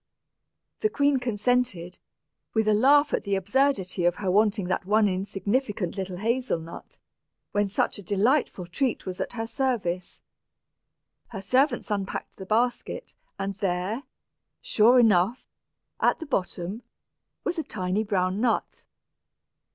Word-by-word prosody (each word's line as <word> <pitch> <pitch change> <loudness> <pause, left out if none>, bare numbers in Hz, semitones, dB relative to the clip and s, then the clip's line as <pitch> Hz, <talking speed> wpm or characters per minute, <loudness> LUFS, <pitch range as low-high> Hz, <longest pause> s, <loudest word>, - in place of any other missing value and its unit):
The 430 - +2
queen 285 -7 +2
consented, 235 -6 -1 0.6
with 220 -1 +2
a 215 - +5
laugh 285 +7 +5
at - - 0
the 200 -1 0
absurdity 195 -3 +1
of 175 0 +3
her 190 -3 -1
wanting 205 0 +2
that 180 0 -2
one 210 +1 +4
insignificant 200 +1 -1
little 190 -2 -4
hazel 235 -1 0
nut, 165 +1 -11 0.5
when 205 -1 +1
such 200 - -1
a - - -7
delightful 205 - +1
treat 250 +8 -1
was 185 -1 -4
at - - -4
her 225 -2 -3
service. 225 -9 -2 1.1
Her 195 -4 -7
servants 255 +3 +1
unpacked 195 -2 -3
the 190 - -9
basket, 245 - -1 0.2
and 195 0 -4
there, 195 +4 -1 0.6
sure 235 +4 +4
enough, 220 +1 +3 0.6
at - - +3
the 325 - -6
bottom, 190 - -3 0.6
was 350 -2 -2
a - - -1
tiny 190 -2 -1
brown 190 -1 0
nut. 235 -3 0
210 Hz, 135 wpm, -26 LUFS, 185-245 Hz, 1.1 s, a